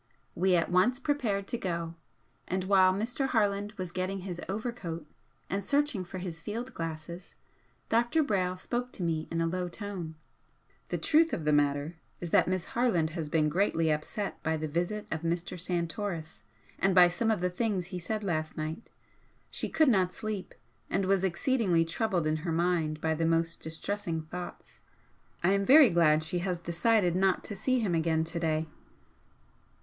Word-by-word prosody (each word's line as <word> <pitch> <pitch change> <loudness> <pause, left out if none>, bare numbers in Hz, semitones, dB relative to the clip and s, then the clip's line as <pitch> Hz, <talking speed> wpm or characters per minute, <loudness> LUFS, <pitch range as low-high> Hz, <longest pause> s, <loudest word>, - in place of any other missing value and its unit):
We 185 +1 +3
at 170 0 +1
once 215 +8 +4
prepared 250 -9 -1
to 240 - -2
go, 170 -5 -3 0.5
and 185 0 -1
while 190 -1 +5
Mr. 235 +8 -1
Harland 205 -3 +1
was 185 -4 -5
getting 185 +2 -2
his 180 -2 -5
overcoat 195 -7 -4 0.4
and 195 +1 -2
searching 280 -7 +1
for 185 - -7
his 175 -3 -6
field 235 +7 -5
glasses, 165 +2 -6 0.5
Dr. 240 +8 +2
Brayle 185 -7 0
spoke 245 +6 -3
to 185 - -4
me 160 -2 -1
in 165 0 -1
a - - +2
low 180 +1 -2
tone 180 -4 -6 0.7
"The - - -1
truth 320 +1 +3
of 155 - -2
the 150 - +3
matter 145 +2 +1 0.2
is 175 -2 -6
that - - +5
Miss 185 -1 -1
Harland 205 -10 +2
has 160 -2 -4
been 155 -1 +2
greatly 165 -1 +2
upset 155 +7 -3
by 160 0 0
the 155 0 -3
visit 175 +7 -2
of 160 - -2
Mr. 170 +2 -2
Santoris 170 -1 -3 0.4
and 190 -1 +2
by 180 -1 +9
some 175 +6 -1
of 220 -3 +2
the 180 0 0
things 185 -2 -1
he 180 - -2
said 215 +5 -3
last 155 -5 -2
night. 155 +7 -5 0.6
She - - -2
could 315 -1 +3
not 190 -7 +3
sleep, 215 -2 -5 0.3
and 195 - +1
was 190 0 +2
exceedingly 190 -2 +2
troubled 180 0 0
in 155 0 +1
her 160 +2 -3
mind 165 -2 0
by 160 0 +1
the 165 +1 0
most 165 0 +1
distressing 165 +1 -3
thoughts. 155 - -8 0.6
I 180 - +4
am 200 0 +2
very 270 +1 +8
glad 155 -2 +4
she 175 +3 -2
has 180 0 -1
decided 175 +2 +2
not 190 0 +2
to 205 - -5
see 255 +5 +1
him 200 -6 0
again 160 -1 +2
to 165 +1 -4
day." 160 -1 0
180 Hz, 175 wpm, -30 LUFS, 165-205 Hz, 0.7 s, by